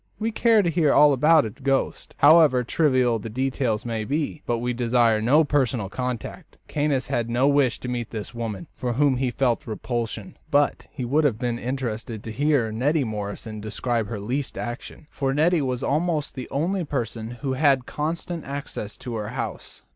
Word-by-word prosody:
We 220 Hz, +2 st, -1 dB
care 225 Hz, -1 st, +4 dB
to 175 Hz, -, +1 dB
hear 160 Hz, -3 st, +3 dB
all 150 Hz, 0 st, +6 dB
about 150 Hz, +3 st, +5 dB
a 110 Hz, -, -4 dB
ghost, 135 Hz, +2 st, -2 dB
however 145 Hz, -4 st, +6 dB
trivial 130 Hz, -4 st, +2 dB
the 110 Hz, -, -6 dB
details 125 Hz, -2 st, -1 dB
may 115 Hz, -2 st, -2 dB
be, 145 Hz, +5 st, -2 dB
but 120 Hz, -, +1 dB
we 125 Hz, +1 st, -2 dB
desire 120 Hz, -2 st, +2 dB
no 140 Hz, +8 st, +5 dB
personal 130 Hz, -8 st, 0 dB
contact. 125 Hz, +1 st, -5 dB
Caius 145 Hz, -3 st, 0 dB
had 115 Hz, -1 st, -1 dB
no 125 Hz, +3 st, +2 dB
wish 140 Hz, -4 st, +2 dB
to -, -, -5 dB
meet 120 Hz, -2 st, -3 dB
this 110 Hz, +1 st, -6 dB
woman, 115 Hz, -5 st, -4 dB
for 125 Hz, -1 st, -2 dB
whom 135 Hz, +1 st, +3 dB
he 130 Hz, 0 st, 0 dB
felt 120 Hz, -1 st, 0 dB
repulsion, 115 Hz, -1 st, -4 dB
but 145 Hz, -1 st, +1 dB
he 125 Hz, -, -5 dB
would 145 Hz, +6 st, +2 dB
have 130 Hz, -7 st, +2 dB
been 120 Hz, 0 st, -2 dB
interested 115 Hz, -4 st, -4 dB
to 115 Hz, -, -6 dB
hear 140 Hz, -2 st, +1 dB
Neddy 140 Hz, +7 st, +1 dB
Morrison 105 Hz, -1 st, -5 dB
describe 110 Hz, +1 st, -2 dB
her 105 Hz, 0 st, -5 dB
least 130 Hz, +7 st, -3 dB
action, 120 Hz, +5 st, -6 dB
for 135 Hz, -1 st, -1 dB
Neddy 165 Hz, +2 st, +3 dB
was 125 Hz, -3 st, -2 dB
almost 155 Hz, 0 st, 0 dB
the 130 Hz, -2 st, -7 dB
only 175 Hz, +7 st, -1 dB
person 115 Hz, -6 st, -3 dB
who 135 Hz, -2 st, 0 dB
had 135 Hz, -2 st, +3 dB
constant 165 Hz, +2 st, -3 dB
access 140 Hz, -7 st, -6 dB
to 120 Hz, -, -7 dB
her 105 Hz, 0 st, -4 dB
house. 125 Hz, 0 st, -6 dB
130 Hz, 185 wpm, -24 LUFS, 115-145 Hz, -, all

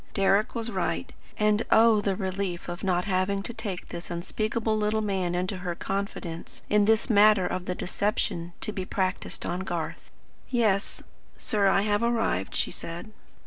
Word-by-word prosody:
Deryck 195 Hz, +1 st, +3 dB
was 230 Hz, 0 st, -2 dB
right; -, -, -2 dB, 0.2 s
and 210 Hz, 0 st, +3 dB
oh 220 Hz, -1 st, +6 dB
the 195 Hz, -1 st, 0 dB
relief 190 Hz, -2 st, -3 dB
of 175 Hz, 0 st, -6 dB
not 180 Hz, -2 st, +1 dB
having 195 Hz, 0 st, 0 dB
to 235 Hz, -, -4 dB
take 210 Hz, -5 st, -5 dB
this 170 Hz, 0 st, -7 dB
unspeakable 215 Hz, +6 st, -1 dB
little 215 Hz, 0 st, +1 dB
man 190 Hz, -4 st, -1 dB
into 185 Hz, +2 st, -1 dB
her 180 Hz, -1 st, -3 dB
confidence 195 Hz, -4 st, -4 dB
in 210 Hz, 0 st, +5 dB
this 220 Hz, +1 st, +3 dB
matter 210 Hz, -4 st, +6 dB
of 180 Hz, 0 st, -2 dB
the 180 Hz, -, -2 dB
deception 175 Hz, -3 st, -1 dB
to -, -, -3 dB
be 190 Hz, -, -3 dB
practised 185 Hz, 0 st, -2 dB
on 175 Hz, -, -2 dB
Garth. 175 Hz, -4 st, -4 dB, 0.4 s
"Yes, 215 Hz, -5 st, +1 dB, 0.3 s
sir, 205 Hz, -2 st, +1 dB
I 195 Hz, 0 st, +4 dB
have 205 Hz, 0 st, +1 dB
arrived," 225 Hz, -, 0 dB
she -, -, 0 dB
said. 170 Hz, +6 st, -7 dB
195 Hz, 165 wpm, -27 LUFS, 180-215 Hz, 0.4 s, oh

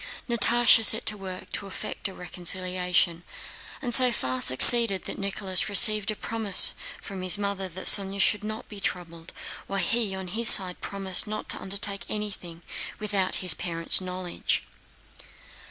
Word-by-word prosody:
Natásha 235 Hz, 0 st, +4 dB
set 220 Hz, +1 st, +4 dB
to 215 Hz, -, +1 dB
work 190 Hz, -2 st, -10 dB
to 200 Hz, -, -7 dB
effect 195 Hz, -, -7 dB
a 195 Hz, -, -10 dB
reconciliation, 180 Hz, -1 st, -3 dB, 0.6 s
and 245 Hz, -2 st, -4 dB
so 250 Hz, 0 st, +4 dB
far 130 Hz, -, -4 dB
succeeded 200 Hz, -, +5 dB
that -, -, -9 dB
Nicholas 195 Hz, -1 st, -1 dB
received 210 Hz, +1 st, +4 dB
a 215 Hz, -, -3 dB
promise 220 Hz, -2 st, +2 dB, 0.3 s
from 195 Hz, -2 st, -10 dB
his 185 Hz, +2 st, +3 dB
mother 200 Hz, -2 st, -5 dB
that 185 Hz, +2 st, -9 dB
Sónya 195 Hz, 0 st, +4 dB
should 210 Hz, +1 st, 0 dB
not 215 Hz, +1 st, -7 dB
be 210 Hz, -, -10 dB
troubled, 170 Hz, -3 st, -6 dB, 0.4 s
while 195 Hz, -, -5 dB
he 215 Hz, 0 st, -3 dB
on 190 Hz, -1 st, -8 dB
his 225 Hz, +5 st, +2 dB
side 185 Hz, -3 st, +3 dB
promised 195 Hz, -1 st, 0 dB
not 215 Hz, 0 st, -7 dB
to -, -, +2 dB
undertake 200 Hz, +1 st, -2 dB
anything 185 Hz, -5 st, -7 dB, 0.3 s
without 205 Hz, -3 st, -3 dB
his 180 Hz, -, +6 dB
parents' 165 Hz, +2 st, +1 dB
knowledge. 185 Hz, -1 st, -3 dB
195 Hz, 155 wpm, -24 LUFS, 180-210 Hz, 0.6 s, his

